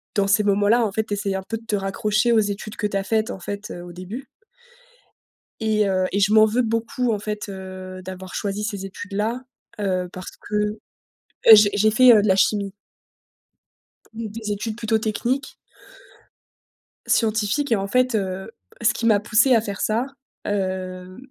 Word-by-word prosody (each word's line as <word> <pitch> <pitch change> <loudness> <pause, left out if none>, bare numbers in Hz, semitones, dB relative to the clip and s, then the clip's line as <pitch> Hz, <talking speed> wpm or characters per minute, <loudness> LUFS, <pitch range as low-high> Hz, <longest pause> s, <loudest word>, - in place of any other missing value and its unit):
dans 200 -2 +2
ces 205 +1 +3
moments-là 205 +4 +3
en 210 - -2
fait, 220 +2 0
tu 210 - -4
essayes 200 -1 -2
un 190 - -3
peu 225 +4 -4
de 225 - -16
te 215 - -1
raccrocher 210 +4 0
aux 230 - +5
études 205 0 -3
que 210 - -1
tu 200 - -2
as 195 - -1
faites 220 +2 0
en - - -7
fait, 200 +3 -6
heu, 175 - -7
au 175 0 -10
début 185 +9 -8 1.3
et 215 -1 +2
heu, 185 -1 +1
et 200 - +1
je 205 +1 +3
m'en 215 0 +7
veux 220 +3 +1
beaucoup 230 +1 -1
en 210 - -2
fait, 210 0 -5
heu, 185 -1 -8
d'avoir 185 0 -8
choisi 205 0 -2
ces 200 -3 -4
études-là, 205 +5 -3 0.4
heu, 185 -3 -1
parce 185 - -8
que 210 0 -2 0.7
eh 225 - +11
j'ai 210 -1 +6
j'ai 210 +1 +3
fait, 250 +3 +7
heu, 215 - +6
de 210 - 0
la 190 - +4
chimie 200 0 +1 1.4
mmh, 225 0 -5
des 215 0 -5
études 215 +2 -4
plutôt 225 -1 +1
techniques 240 +6 -2 1.5
scientifiques 225 +5 +1
et - - +5
en 195 -1 -2
fait, 255 +3 +2
heu, 190 -2 -3 0.3
ce 230 - +3
qui 230 - -3
m'a 215 -3 +5
poussé 230 +4 +4
à 225 - +3
faire 200 -2 -5
ça, 225 +4 +1 0.4
heu, 185 -2 -3
210 Hz, 185 wpm, -22 LUFS, 195-220 Hz, 1.5 s, eh